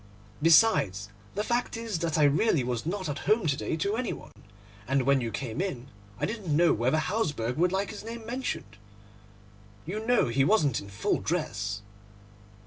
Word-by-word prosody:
Besides, 155 - +4 0.3
the 210 - 0
fact 240 +1 -1
is 225 -6 -3
that 165 -1 -1
I 150 - +4
really 145 - +3
was 120 +2 -3
not 185 +1 -2
at 145 -1 -3
home 215 -2 +4
to 145 -3 +2
day 155 +2 -3
to 200 +6 0
any 250 +1 -2
one; - - -11 0.6
and 135 0 +2
when 140 0 +3
you 115 - -2
came 125 +5 -4
in 135 -10 -4 0.3
I - - +1
didn't 200 -9 -2
know 170 0 +5
whether 125 +7 +1
Hausberg 155 - -1
would 175 +2 +3
like 195 +1 -1
his 210 - -8
name 230 0 -7
mentioned. 235 - -4 1.1
You 205 +7 -4
know 240 - +3
he 135 +4 +2
wasn't 145 - +3
in 100 - -10
full 100 +2 0
dress. 100 - -2
160 Hz, 180 wpm, -28 LUFS, 125-210 Hz, 1.1 s, know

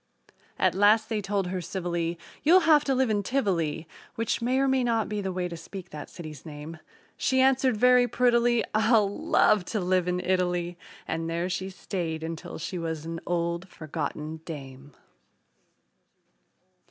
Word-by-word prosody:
At - - +3
last 210 +4 +4
they 220 -2 -1
told 200 -1 -1
her 180 0 -3
civilly, 170 -1 -2 0.2
"You'll 355 +5 +6
have 310 -3 +5
to 270 - +1
live 255 -3 +2
in 205 -1 +1
Tivoli" 175 - -1 0.3
(Which 230 0 -1
may 250 +3 +1
or 270 0 +3
may 265 -1 +2
not 230 -2 +1
be 210 -1 -3
the 190 -1 -2
way 180 -1 -2
to 170 - -6
speak 185 +1 -9
that 150 -1 -8
city's 155 -5 -9
name). 155 +1 -8 0.4
She 260 - +1
answered 260 -2 +3
very 250 +1 +5
prettily: 240 -1 +3
"I'll 215 -1 +4
love 205 0 +2
to 215 - -2
live 185 -1 +1
in 180 0 0
Italy" 180 -1 0 0.3
And 165 0 -2
there 170 +2 -1
she 185 +1 -3
stayed 170 -4 -4
until 165 0 -6
she 175 +3 -4
was 160 -2 -4
an 165 0 -4
old, 170 +1 -1
forgotten 155 -1 -5
dame. 140 -3 -9
185 Hz, 165 wpm, -27 LUFS, 165-225 Hz, 0.4 s, You'll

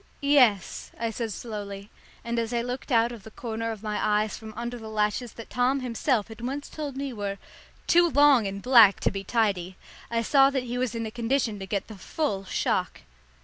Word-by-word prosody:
"Yes," 255 -10 +3
I 230 0 -1
said 225 -1 -4
slowly, 200 -2 -7 0.3
and 235 0 -1
as 230 +1 -2
I 235 - 0
looked 250 +3 -5
out 230 0 +3
of 235 -3 -9
the 220 - -11
corner 230 0 -4
of 220 -1 -8
my 210 -1 -2
eyes 210 0 +1
from 220 -1 -9
under 240 +1 -5
the 220 -1 -8
lashes 215 +2 -1
that 230 - -11
Tom 255 +2 +1
himself 240 -2 0
had 225 +1 -10
once 275 +4 -4
told 290 -4 -6
me 275 -1 -3
were 200 -2 -4 0.5
"too 345 0 +5
long 285 -6 +5
and 195 0 -6
black 230 -6 +7
to - - +2
be 195 0 -5
tidy," 195 -4 0 0.3
I 230 0 0
saw 270 +3 +5
that 270 -2 -1
he 245 0 -4
was 250 -3 -1
in 230 0 -2
a 220 - -5
condition 235 -2 -1
to 195 - -7
get 200 0 -2
the 220 - -9
full 200 - -2
shock. - - -1
230 Hz, 210 wpm, -26 LUFS, 210-250 Hz, 0.5 s, black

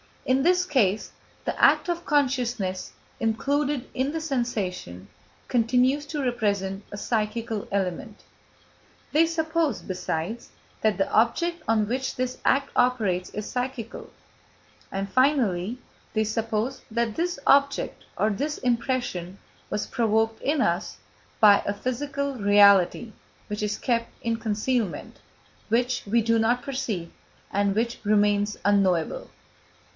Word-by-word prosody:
In 260 +1 +2
this 360 +2 +3
case, 220 - +1 0.3
the - - -3
act - - +5
of 345 0 -2
consciousness, 245 -9 0 0.3
included 275 +4 0
in 265 +2 0
the 325 +1 -3
sensation, 205 - -3 0.4
continues 250 +4 +2
to 290 -1 -3
represent 205 -5 -1
a 205 - -6
psychical 220 0 -2
element. 195 +2 -3 0.9
They 315 +2 +5
suppose, 320 - 0
besides, 185 +4 -4 0.3
that 215 -2 +2
the 195 0 0
object 335 +10 +2
on 215 -2 +2
which 260 +3 -2
this 255 0 -2
act 275 +1 +2
operates 215 -8 +1
is 210 0 -5
psychical; 250 -2 -4 0.8
and 195 0 -3
finally, 245 -7 +2 0.4
they 220 - +2
suppose 225 +3 -2
that 235 -1 -1
this 350 0 -1
object 280 0 +2
or 215 - +2
this 290 +9 -2
impression 235 -7 -1 0.3
was 210 - -2
provoked 225 -1 0
in 295 +2 +1
us - - 0 0.4
by 205 -2 +7
a 200 - +1
physical 280 +5 -3
reality 205 0 +5 0.4
which 210 0 -4
is 210 0 -1
kept 230 -2 0
in 230 -1 0
concealment, 220 -1 -2 0.5
which 245 +2 +1
we 230 +3 +3
do 230 +1 +2
not 240 +3 +2
perceive, 225 -11 -3 0.4
and 200 0 +1
which 230 +2 -1
remains 205 0 +2
unknowable. 190 -5 +2
230 Hz, 125 wpm, -25 LUFS, 205-265 Hz, 0.9 s, by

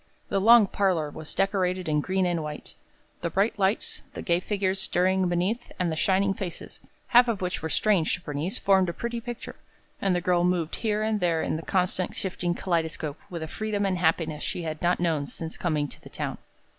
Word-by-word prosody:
The 195 - +1
long 230 +1 +8
parlor 185 -7 0
was 155 0 -6
decorated 185 -2 +1
in 150 -1 +2
green 185 +3 0
and 175 -2 0
white. 150 -1 -7 0.5
The 170 - -1
bright 200 +5 +1
lights, 195 +2 0
the - - -5
gay 170 0 +2
figures 190 0 -1
stirring 185 +1 +2
beneath, 185 +8 -1
and 175 -2 0
the - - -1
shining 195 +4 +2
faces, 185 -3 -6 0.3
half 245 +1 +7
of 225 -4 0
which 180 0 -2
were 160 - -3
strange 190 -1 +2
to - - -12
Bernice, 150 +4 -3
formed 190 -2 +3
a - - -3
pretty 235 +4 -4
picture, 240 +1 -7 0.4
and 195 -2 +2
the - - +2
girl 175 0 +2
moved 175 -3 0
here 215 -1 0
and 215 -1 +1
there 170 -3 +1
in - - -1
the 160 - -3
constantly 185 +1 0
shifting 180 -2 -2
kaleidoscope 160 -5 -2
with 170 -3 -5
a - - -4
freedom 210 +3 -2
and 185 -2 0
happiness 160 -2 +1
she 175 - -3
had 155 -1 -4
not 175 +1 +2
known 160 -5 0
since 165 +2 -7
coming 155 -4 0
to - - -14
the - - -12
town. - - -4
180 Hz, 205 wpm, -27 LUFS, 165-195 Hz, 0.5 s, long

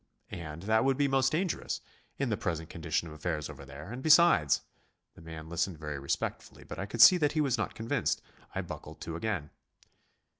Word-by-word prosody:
And 80 0 -7
that 110 +2 +3
would 135 -1 +2
be 145 -1 +3
most 135 -1 +2
dangerous 175 +3 -1 0.4
in - - 0
the - - +1
present 80 -2 -3
condition 85 - -2
of 80 - -9
affairs 75 -1 -3
over 70 - -11
there, 70 +8 -9
and 125 +2 -6
besides....' 155 - +6 0.5
The - - -15
man 80 -1 -8
listened 85 +1 -1
very 75 -2 -5
respectfully, 70 - -3
but - - -8
I 100 - -3
could 115 +2 -1
see 180 +9 +10
that 150 -3 +1
he 155 - 0
was 135 -4 +2
not 105 - -2
convinced. 115 +1 0 0.4
I - - 0
buckled - - -8
to 80 - -5
again...." 85 -5 -3
90 Hz, 195 wpm, -30 LUFS, -, 0.5 s, see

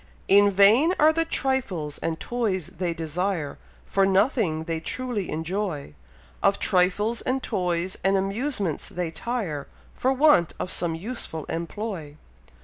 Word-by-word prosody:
In 205 +1 +6
vain 215 - +5
are 310 +1 +6
the 330 +1 +1
trifles 205 - -1
and 160 -1 -2
toys 210 -9 -2
they 180 -2 0
desire, 165 0 -2 0.3
For 195 - +1
nothing 195 - +2
they 165 0 -3
truly 235 +2 -2
enjoy; 160 - -3 0.5
Of - - +3
trifles, 200 +6 +2
and 260 +1 -1
toys, 180 0 -1
and 195 +1 +3
amusements 195 - -2
they 175 -2 -3
tire, 165 - -3 0.3
For 260 - +1
want 265 - +4
of 185 - -3
some 170 -2 -1
useful 165 - -4
employ. 170 -3 -5
190 Hz, 135 wpm, -25 LUFS, 165-230 Hz, 0.5 s, In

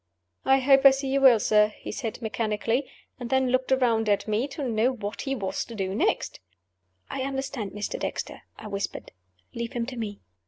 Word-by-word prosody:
"I 270 - +5
hope 270 0 +5
I 275 - +11
see 270 0 -1
you 275 +1 +1
well, 255 -4 +7
sir," 210 0 +4
he - - -7
said, 230 -1 -5
mechanically 225 +3 -1 0.3
and 240 -2 -5
then 265 -1 +2
looked 255 +1 0
around 230 -4 +2
at 205 +1 +1
me, 215 +5 0
to 275 -1 -4
know 230 +2 +2
what 210 -3 -5
he 270 -1 -2
was 195 -5 -2
to 235 - -9
do 190 -2 -2
next. 210 - 0 0.7
"I - - -4
understand 270 -5 -3
Mr. 210 0 -4
Dexter," - - -4 0.2
I - - -11
whispered. 200 -1 -4 0.4
"Leave 235 0 -4
him 235 -1 -1
to 255 0 -7
me." 210 -3 -4
235 Hz, 195 wpm, -26 LUFS, 215-265 Hz, 0.7 s, I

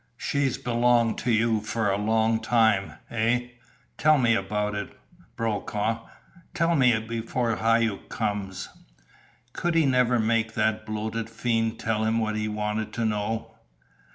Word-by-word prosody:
She's 140 -3 0
belonged 120 -1 +2
to 125 - 0
you 110 0 +2
for 110 -1 -1
a - - +1
long 110 +1 +2
time, 110 -5 +2 0.2
eh? 120 +2 0 0.5
Tell 155 0 +5
me 120 -4 +3
about 105 0 -1
it, 100 0 -6 0.4
Brokaw 110 0 -2 0.5
tell 165 +1 +2
me 125 -5 +4
before 115 +1 -2
Hauck 115 -2 +1
comes!" 95 -3 -3 0.9
Could 175 -1 -1
he 165 -2 +4
never 125 -2 +3
make 110 0 +1
that 110 0 0
bloated 110 +1 -3
fiend 115 -1 -1
tell 110 -1 -1
him 110 +1 +1
what 110 -1 0
he 110 0 -1
wanted 105 0 -3
to 115 - -1
know? 110 +1 -2
115 Hz, 140 wpm, -26 LUFS, 110-115 Hz, 0.9 s, Tell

